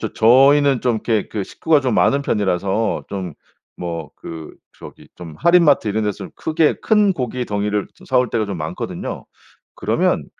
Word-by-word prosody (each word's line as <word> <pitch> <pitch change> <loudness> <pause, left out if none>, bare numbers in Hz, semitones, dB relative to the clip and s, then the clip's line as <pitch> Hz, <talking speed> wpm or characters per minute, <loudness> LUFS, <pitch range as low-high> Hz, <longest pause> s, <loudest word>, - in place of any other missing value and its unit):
저 - - -4
저희는 135 +3 +5
좀 125 -2 +1
이렇게 110 -1 -1
그 105 -3 -4
식구가 155 +6 +1
좀 130 -4 -1
많은 140 +1 +3
편이라서 100 -1 -1
좀 95 -5 -5 0.4
뭐 85 -3 -5
그 80 -2 -9 0.3
저기 - - -13
좀 85 -3 -10
할인마트 170 -9 +4
이런 105 +1 -1
데서 100 -2 -4
크게 155 -1 +1
큰 210 -3 +3
고기 125 -3 -3
덩이를 105 0 -2
저 - - -18
사 130 -1 +2
올 125 - -1
때가 115 -2 0
좀 100 -3 -5
많거든요. 75 0 -5 0.5
그러면 - - 0
110 Hz, 310 characters per minute, -19 LUFS, 100-140 Hz, 0.5 s, 저희는